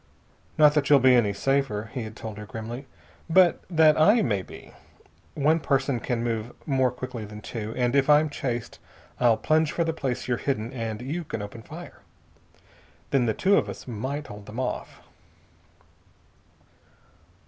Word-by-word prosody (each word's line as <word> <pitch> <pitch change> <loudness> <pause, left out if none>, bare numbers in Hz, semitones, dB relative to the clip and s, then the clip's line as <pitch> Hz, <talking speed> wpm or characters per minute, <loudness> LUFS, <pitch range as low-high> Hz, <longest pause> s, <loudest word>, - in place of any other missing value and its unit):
"Not 150 -1 +6
that 145 -2 +1
you'll 145 - +8
be 130 -1 +5
any 120 -5 +4
safer," 110 -1 -1
he 130 - -3
had 110 -1 -7
told 110 -3 -7
her 105 - -8
grimly, 115 +5 -7 0.4
"but 180 0 +5
that 160 -3 +5
I 215 +8 +5
may 100 -6 0
be. - - -13 0.6
One 155 +3 +3
person 135 -3 0
can 115 0 -2
move 115 0 -3
more 130 -3 +2
quickly 125 -2 -6
than 105 0 -9
two. 110 0 -6
And 125 +1 +1
if 140 +1 +3
I'm 150 +1 +6
chased 125 -5 -4 0.4
I'll 120 -3 +4
plunge 155 0 +2
for 170 - 0
the 160 0 -1
place 130 -5 -3
you're 120 -1 0
hidden, 120 -3 -2
and 115 -2 -4
you 160 +7 -3
can 115 -8 -5
open 105 +3 -8
fire. - - -11 1.1
Then 130 -3 +2
the 110 - 0
two 200 +1 +3
of - - 0
us - - -9
might 130 +6 -4
hold 105 0 -11
them 110 +4 -7
off." 130 - -4
125 Hz, 170 wpm, -26 LUFS, 110-145 Hz, 1.1 s, you'll